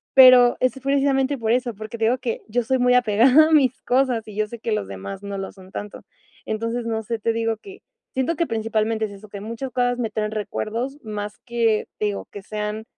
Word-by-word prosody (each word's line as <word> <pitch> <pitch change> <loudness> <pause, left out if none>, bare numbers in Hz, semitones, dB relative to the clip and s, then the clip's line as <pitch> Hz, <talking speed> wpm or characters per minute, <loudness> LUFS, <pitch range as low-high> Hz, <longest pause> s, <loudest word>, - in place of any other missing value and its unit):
Pero 255 -2 +8
es 255 - +2
precisamente 275 0 +1
por 225 -1 -1
eso, 245 -2 0
porque 215 +3 -7
te 225 - +1
digo 245 +3 +3
que 240 -2 -3
yo 245 +2 0
soy 260 +3 +1
muy 250 0 +4
apegada 250 +7 +5
a - - -2
mis 260 -4 +4
cosas 250 -3 +1
y 210 - -9
yo 215 0 +1
sé 235 +1 -9
que 230 -1 -2
los 100 - -2
demás 185 - -7
no 200 -1 -5
lo 195 - -5
son 190 -1 -15
tanto. 205 -1 -7 0.4
Entonces, 230 +2 -2
no 225 -1 -1
sé, 230 +1 -3
te 230 +2 +1
digo 225 0 0
que 390 - -13 0.3
siento 265 +6 0
que 335 - +1
principalmente 220 0 0
es 205 - -7
eso, 200 +1 -12
que 200 - -7
muchas 230 +5 -5
cosas 245 0 0
me 225 -2 -1
traen 215 0 -2
recuerdos 225 +5 -3
más 210 -1 -5
que, 230 -3 +1
te 210 - 0
digo, 205 -1 -3
que 205 - -8
sean, 210 +1 -4
230 Hz, 225 wpm, -23 LUFS, 215-250 Hz, 0.4 s, Pero